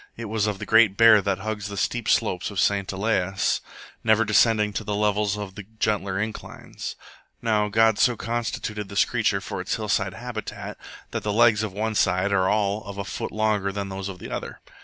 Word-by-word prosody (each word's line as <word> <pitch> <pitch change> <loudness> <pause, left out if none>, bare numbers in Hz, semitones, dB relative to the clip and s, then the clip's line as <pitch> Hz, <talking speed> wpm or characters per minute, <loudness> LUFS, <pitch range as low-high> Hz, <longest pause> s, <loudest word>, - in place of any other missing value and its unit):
It 115 - -5
was 110 -1 0
of 105 -2 -2
the - - -6
great 110 -3 +5
bear 115 -2 +7
that 100 -1 0
hugs 105 -1 -3
the 100 0 -7
steep 120 +2 -1
slopes 95 -6 +1
of 100 -2 -4
St 100 0 +1
Elias, 95 -2 0 0.4
never 110 0 +4
descending 105 0 +3
to 110 - -3
the 105 0 -2
levels 105 0 +1
of 100 -2 -6
the 100 - -8 0.2
gentler 100 -3 0
inclines. 110 0 -6 0.4
Now 110 -3 +1
God 110 0 +3
so 120 -2 +3
constituted 110 -3 -3
this 100 0 +3
creature 110 -5 0
for 90 - -5
its 90 - -2
hillside 100 -3 -1
habitat 120 -2 -6 0.3
that - - -2
the 105 - -2
legs 110 -1 +4
of 110 -2 -2
one 110 +3 -2
side 95 -1 +2
are 95 -2 +2
all 105 0 0
of 100 -1 -8
a 100 - -4
foot 90 - -5
longer 105 -2 0
than 100 0 -4
those 95 0 -5
of 95 - -7
the - - -9
other. - - -5
105 Hz, 200 wpm, -24 LUFS, 100-110 Hz, 0.4 s, bear